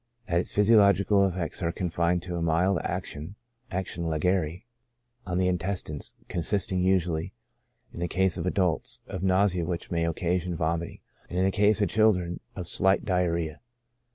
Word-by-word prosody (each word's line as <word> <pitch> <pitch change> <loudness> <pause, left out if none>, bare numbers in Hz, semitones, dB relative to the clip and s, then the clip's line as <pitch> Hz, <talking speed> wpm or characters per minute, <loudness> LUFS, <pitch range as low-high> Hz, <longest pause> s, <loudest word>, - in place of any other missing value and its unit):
That 85 0 +2
its - - -3
physiological 100 -2 +5
effects 90 -3 -4
are 85 -1 0
confined 85 0 0
to 90 -1 -4
a 85 - -2
mild 85 +3 +2
action 80 +7 -4 0.3
(action 90 -2 -3
legere) 80 +2 0 0.6
on 90 -1 -1
the 90 0 +2
intestines, 90 -4 -3
consisting 95 +1 -1
usually, 90 -1 +1 0.6
in - - -8
the 85 - -1
case 95 0 +1
of 85 0 -3
adults, 90 -3 0
of 95 -2 -6
nausea 95 -1 +2
which 85 +1 -4
may 85 -1 +1
occasion 90 +1 -1
vomiting; 85 +1 -2 0.3
and 90 - -4
in 95 - +3
the 95 - +2
case 105 +1 +3
of 100 - +1
children, 90 -5 +2 0.2
of 90 -3 -5
slight 95 +2 +2
diarrhoea. 85 -4 0
90 Hz, 155 wpm, -27 LUFS, 85-95 Hz, 0.6 s, physiological